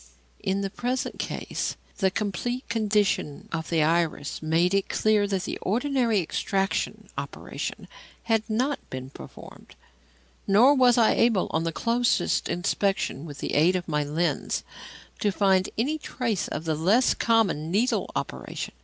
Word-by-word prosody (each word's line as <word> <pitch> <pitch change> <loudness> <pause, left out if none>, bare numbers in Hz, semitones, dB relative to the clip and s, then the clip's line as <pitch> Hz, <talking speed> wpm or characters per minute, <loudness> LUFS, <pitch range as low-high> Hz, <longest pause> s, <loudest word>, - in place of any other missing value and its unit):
In 195 +1 -1
the 195 -1 -3
present 250 +4 -3
case, - - -3 0.2
the 190 -2 +3
complete 215 +6 -3
condition 210 -9 0
of 160 -1 -3
the 165 -2 +2
iris 160 -3 0
made 165 +4 +2
it 195 -1 +1
clear 215 -1 +2
that 195 -2 -1
the - - -4
ordinary 240 -1 +1
extraction 195 +4 -1
operation - - -6 0.4
had 225 -2 +2
not 255 +6 0
been 130 0 -6
performed, - - -12 0.7
nor 225 +8 +6
was 250 -3 +5
I 230 -2 +5
able, 225 -6 +2
on 160 +1 0
the 165 - 0
closest 235 +6 +1
inspection 175 -4 -1
with 145 -2 -9
the - - -4
aid 165 +5 +4
of 180 -1 -2
my 150 -2 0
lens, 160 +4 -1 0.6
to 205 - +1
find 190 -1 +2
any 290 +8 0
trace 230 - -2
of 155 - -5
the 160 - +1
less 195 +11 +3
common 205 -9 +1
"needle 220 +9 +1
operation." - - -4
195 Hz, 145 wpm, -26 LUFS, 165-230 Hz, 0.7 s, nor